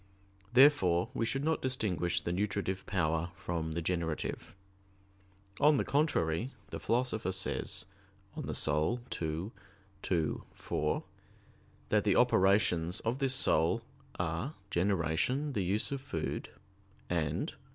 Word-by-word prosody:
Therefore 120 Hz, -11 st, +5 dB
we 115 Hz, -, 0 dB
should 135 Hz, +4 st, -1 dB
not 160 Hz, +1 st, +1 dB
distinguish 105 Hz, -10 st, 0 dB
the 85 Hz, -, -2 dB
nutritive 95 Hz, -1 st, -2 dB
power 80 Hz, -3 st, 0 dB
from 85 Hz, -4 st, -3 dB
the 85 Hz, +1 st, -2 dB
generative. 85 Hz, -1 st, -2 dB, 1.0 s
On 150 Hz, +1 st, +6 dB
the -, -, +1 dB
contrary, 125 Hz, -, +1 dB, 0.2 s
The -, -, -4 dB
Philosopher 115 Hz, -5 st, 0 dB
says 95 Hz, -1 st, -1 dB, 0.5 s
(De -, -, -7 dB
Anima 75 Hz, +11 st, 0 dB, 0.2 s
ii, 80 Hz, +6 st, -2 dB, 0.5 s
2,4) 80 Hz, -4 st, -1 dB, 0.9 s
that -, -, +3 dB
the -, -, +3 dB
operations 95 Hz, -2 st, +3 dB
of 115 Hz, +4 st, -1 dB
this 135 Hz, -2 st, +3 dB
soul 80 Hz, -10 st, +3 dB, 0.3 s
are 90 Hz, -, -2 dB, 0.2 s
"generation, 95 Hz, -, +1 dB
the 100 Hz, -, 0 dB
use 100 Hz, +8 st, 0 dB
of 140 Hz, -1 st, -3 dB
food," 80 Hz, -, -4 dB, 0.6 s
and 80 Hz, -4 st, -1 dB
(cf. -, -, -19 dB
95 Hz, 120 wpm, -32 LUFS, 85-125 Hz, 1.0 s, On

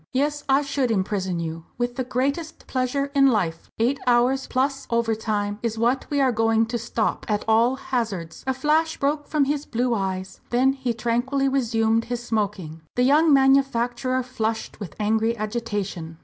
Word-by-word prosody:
"Yes, 290 Hz, +2 st, 0 dB
I 270 Hz, +2 st, +4 dB
should 275 Hz, -3 st, -1 dB
imprison 190 Hz, -4 st, -1 dB
you, 165 Hz, 0 st, -5 dB
with 240 Hz, 0 st, -2 dB
the 260 Hz, -, -1 dB
greatest 280 Hz, +6 st, -2 dB
pleasure 270 Hz, +2 st, -1 dB
in 275 Hz, -1 st, +5 dB
life. 180 Hz, -10 st, 0 dB
Eight 250 Hz, +5 st, +1 dB
hours 250 Hz, +2 st, +3 dB
plus 275 Hz, +1 st, -1 dB
overtime 215 Hz, -3 st, -1 dB
is 225 Hz, -1 st, -2 dB
what 240 Hz, +4 st, +1 dB
we 285 Hz, -, 0 dB
are 265 Hz, -2 st, +4 dB
going 225 Hz, 0 st, +2 dB
to 235 Hz, -, 0 dB
stop, 230 Hz, -1 st, -1 dB
at 210 Hz, -1 st, 0 dB
all 230 Hz, +3 st, +4 dB
hazards!" 225 Hz, -11 st, -3 dB
A 265 Hz, -, +2 dB
flash 310 Hz, +4 st, +1 dB
broke 295 Hz, +1 st, -1 dB
from 300 Hz, -3 st, +2 dB
his 290 Hz, +1 st, -2 dB
blue 245 Hz, +1 st, 0 dB
eyes. 190 Hz, -2 st, -3 dB
Then 260 Hz, +3 st, +3 dB
he 260 Hz, -4 st, -3 dB
tranquilly 245 Hz, +4 st, 0 dB
resumed 230 Hz, -4 st, +1 dB
his 240 Hz, 0 st, -4 dB
smoking. 200 Hz, -8 st, -2 dB
The 245 Hz, -, +2 dB
young 300 Hz, +5 st, +5 dB
manufacturer 260 Hz, -2 st, +3 dB
flushed 225 Hz, -4 st, -3 dB
with 200 Hz, -6 st, -7 dB
angry 220 Hz, +2 st, +1 dB
agitation. 205 Hz, -7 st, -4 dB
240 Hz, 165 wpm, -24 LUFS, 220-270 Hz, -, in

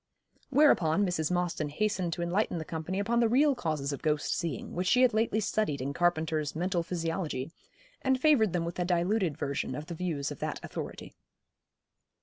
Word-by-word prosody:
Whereupon 205 Hz, -, +4 dB
Mrs. 165 Hz, -4 st, -1 dB
Mostyn 175 Hz, -4 st, -1 dB
hastened 185 Hz, +1 st, -1 dB
to 175 Hz, -, -3 dB
enlighten 180 Hz, +1 st, 0 dB
the 160 Hz, -, -4 dB
company 165 Hz, +4 st, -4 dB
upon 230 Hz, +4 st, +1 dB
the 230 Hz, -2 st, +3 dB
real 280 Hz, +5 st, +4 dB
causes 155 Hz, -, -2 dB
of 140 Hz, -, -6 dB
ghost 150 Hz, -2 st, 0 dB
seeing, 165 Hz, -6 st, -4 dB
which 180 Hz, +1 st, -1 dB
she 250 Hz, +6 st, +5 dB
had 250 Hz, -, +4 dB
lately 220 Hz, 0 st, +1 dB
studied 210 Hz, -8 st, 0 dB
in 135 Hz, +2 st, -3 dB
Carpenter's 160 Hz, -3 st, 0 dB
'Mental 175 Hz, +2 st, 0 dB
Physiology,' 165 Hz, -4 st, -3 dB, 0.5 s
and 265 Hz, -1 st, +2 dB
favoured 255 Hz, -, +4 dB
them 170 Hz, -1 st, -1 dB
with 170 Hz, +1 st, -5 dB
a -, -, +2 dB
diluted 180 Hz, -1 st, +1 dB
version 140 Hz, -2 st, -2 dB
of 150 Hz, +2 st, -6 dB
the 170 Hz, -, -6 dB
views 160 Hz, -5 st, -2 dB
of 145 Hz, -, -7 dB
that -, -, -3 dB
authority. -, -, -7 dB
175 Hz, 180 wpm, -30 LUFS, 155-210 Hz, 0.5 s, she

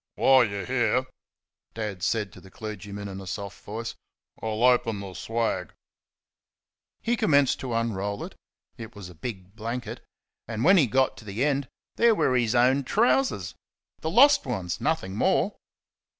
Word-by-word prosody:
"While 130 Hz, -2 st, +6 dB
you 100 Hz, -2 st, -4 dB
are -, -, -6 dB
here," 130 Hz, 0 st, +1 dB, 0.7 s
Dad 105 Hz, -5 st, -4 dB
said 105 Hz, 0 st, -1 dB
to -, -, -13 dB
the 95 Hz, -, -15 dB
clergyman, 100 Hz, 0 st, -7 dB
in 95 Hz, 0 st, -7 dB
a 95 Hz, -, -10 dB
soft 100 Hz, +1 st, -6 dB
voice, 115 Hz, +3 st, -5 dB, 0.5 s
"I'll 110 Hz, +1 st, -2 dB
open 120 Hz, -4 st, +3 dB
the 100 Hz, -2 st, -7 dB
swag." 115 Hz, +6 st, -2 dB, 1.3 s
He 235 Hz, +1 st, +1 dB
commenced 145 Hz, -, +3 dB
to 125 Hz, -3 st, -3 dB
unroll 100 Hz, -3 st, -2 dB
it -, -, -8 dB, 0.5 s
it 110 Hz, -2 st, -9 dB
was 100 Hz, -3 st, -9 dB
a -, -, -12 dB
big 95 Hz, +1 st, -7 dB
blanket 115 Hz, +3 st, -5 dB, 0.5 s
and 110 Hz, 0 st, -3 dB
when 190 Hz, +6 st, +6 dB
he 145 Hz, -7 st, +5 dB
got 130 Hz, +4 st, +1 dB
to 110 Hz, -, -12 dB
the 105 Hz, +6 st, -1 dB
end 140 Hz, -2 st, 0 dB, 0.3 s
there 230 Hz, -1 st, +5 dB
were 130 Hz, -9 st, +2 dB
his 120 Hz, -1 st, +1 dB
own 130 Hz, +3 st, +4 dB
trousers 125 Hz, -8 st, +1 dB, 0.5 s
the 160 Hz, -, -3 dB
lost 280 Hz, -, +6 dB
ones, 90 Hz, -3 st, -3 dB
nothing 95 Hz, +1 st, -1 dB
more. -, -, +2 dB
115 Hz, 165 wpm, -26 LUFS, 100-130 Hz, 1.3 s, While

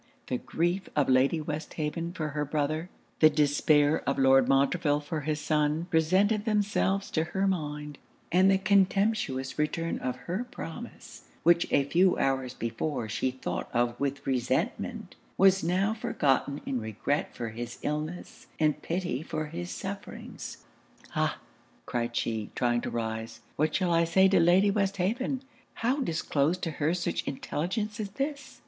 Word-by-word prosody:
The 125 Hz, -, -2 dB
grief 175 Hz, +4 st, -1 dB
of 145 Hz, -3 st, +2 dB
Lady 130 Hz, +5 st, +4 dB
Westhaven 155 Hz, +2 st, -4 dB
for 155 Hz, -4 st, -3 dB
her 150 Hz, 0 st, -2 dB
brother, 155 Hz, +3 st, -1 dB, 0.3 s
the 155 Hz, -, +8 dB
despair 145 Hz, 0 st, +3 dB
of 140 Hz, -, 0 dB
Lord 135 Hz, -1 st, +5 dB
Montreville 145 Hz, +2 st, +3 dB
for 150 Hz, +1 st, -4 dB
his 150 Hz, +1 st, -1 dB
son, 150 Hz, +2 st, +1 dB
presented 190 Hz, +7 st, +3 dB
themselves 205 Hz, -2 st, +1 dB
to 160 Hz, 0 st, +1 dB
her 190 Hz, +3 st, -1 dB
mind; 150 Hz, -5 st, -3 dB, 0.3 s
and 185 Hz, +3 st, +5 dB
the 195 Hz, -, +5 dB
contemptuous 195 Hz, -8 st, +1 dB
return 165 Hz, +2 st, -1 dB
of 125 Hz, -1 st, -2 dB
her 185 Hz, +8 st, -2 dB
promise, -, -, -9 dB, 0.2 s
which 170 Hz, 0 st, +4 dB
a 140 Hz, -, +4 dB
few 180 Hz, +6 st, +3 dB
hours 135 Hz, -2 st, 0 dB
before 115 Hz, +1 st, -3 dB
she 120 Hz, +4 st, 0 dB
thought 130 Hz, 0 st, -4 dB
of 120 Hz, 0 st, +1 dB
with 140 Hz, 0 st, -2 dB
resentment, 130 Hz, -2 st, -1 dB, 0.2 s
was 195 Hz, 0 st, +5 dB
now 185 Hz, +5 st, +1 dB
forgotten 140 Hz, -, 0 dB
in 130 Hz, -3 st, -2 dB
regret 110 Hz, +7 st, -2 dB
for 115 Hz, -1 st, -4 dB
his 120 Hz, +2 st, -6 dB
illness 155 Hz, +4 st, -4 dB
and 155 Hz, -2 st, +2 dB
pity 170 Hz, -6 st, -2 dB
for 155 Hz, -1 st, -3 dB
his 175 Hz, +2 st, -5 dB
sufferings. 200 Hz, +1 st, -7 dB, 0.5 s
'Ah!' -, -, +1 dB, 0.5 s
cried 120 Hz, -1 st, -2 dB
she, 110 Hz, -3 st, -1 dB
trying 120 Hz, -1 st, +1 dB
to -, -, -3 dB
rise, 110 Hz, 0 st, -4 dB
'what 155 Hz, +1 st, +1 dB
shall 180 Hz, -3 st, +2 dB
I 165 Hz, 0 st, +4 dB
say 190 Hz, +3 st, +5 dB
to 190 Hz, -1 st, +4 dB
Lady 180 Hz, +4 st, +5 dB
Westhaven? 205 Hz, +7 st, 0 dB, 0.3 s
How 250 Hz, +5 st, 0 dB
disclose 160 Hz, -, 0 dB
to 175 Hz, -3 st, -3 dB
her 155 Hz, +3 st, 0 dB
such 175 Hz, -, -2 dB
intelligence 190 Hz, -, -3 dB
as 210 Hz, -2 st, -3 dB
this?' 280 Hz, +6 st, -4 dB
155 Hz, 150 wpm, -29 LUFS, 140-185 Hz, 0.5 s, the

